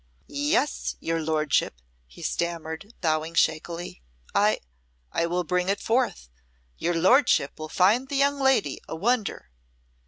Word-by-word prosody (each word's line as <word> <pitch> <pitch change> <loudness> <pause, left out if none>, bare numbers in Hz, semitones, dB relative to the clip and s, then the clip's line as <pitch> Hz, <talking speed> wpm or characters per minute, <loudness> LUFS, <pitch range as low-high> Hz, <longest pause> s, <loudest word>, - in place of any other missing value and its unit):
"Yes, 295 +2 0
your 165 0 -1
lordship," 155 - 0 0.3
he - - -13
stammered, 170 +4 -3
bowing 160 0 0
shakily, 165 - 0 0.3
"I - - +3 0.5
I 170 - 0
will 180 +1 0
bring 180 +2 0
it 200 - +1
forth. 235 - 0 0.5
Your 175 0 0
lordship 185 - +3
will 155 0 -6
find 220 - +3
the 285 - -3
young 280 +1 +2
lady 265 - +2
a - - -5
wonder." 215 - -1
175 Hz, 130 wpm, -26 LUFS, 160-245 Hz, 0.5 s, I